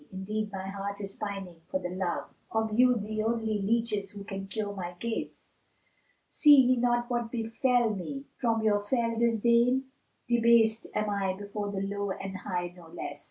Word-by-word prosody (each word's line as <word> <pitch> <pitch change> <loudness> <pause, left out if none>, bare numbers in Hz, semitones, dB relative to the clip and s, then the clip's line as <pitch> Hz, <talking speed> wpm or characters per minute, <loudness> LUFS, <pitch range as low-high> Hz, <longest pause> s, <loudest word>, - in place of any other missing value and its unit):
indeed 210 +3 -3
my 190 -1 -5
heart 200 +1 -4
is 195 -1 -6
pining 195 -5 -5
for 185 - 0
the 180 -1 -4
love 185 -1 -3
* - - -38
Of 220 0 0
you, 250 +2 +5
the 215 +1 -3
only 220 -2 0
leaches 210 -1 0
who 200 -1 -7
can 195 -1 -6
cure 205 +1 -3
my 180 -3 -5
case: 235 -1 -5 0.7
See 295 -1 +7
ye 255 -2 +6
not 240 0 +2
what 240 -2 -1
befel 235 0 +1
me 275 +9 -5
from 225 -3 0
your 210 -1 +3
fell 230 +2 0
disdain? 235 +3 +3 0.2
* - - -45
Debased 230 -1 +4
am 210 0 0
I 195 -2 0
before 205 0 -4
the 195 -1 -3
low 200 0 -2
and 190 0 -5
high 175 -3 -3
no 175 -2 -14
less. 170 +1 -6
215 Hz, 180 wpm, -29 LUFS, 195-235 Hz, 0.7 s, See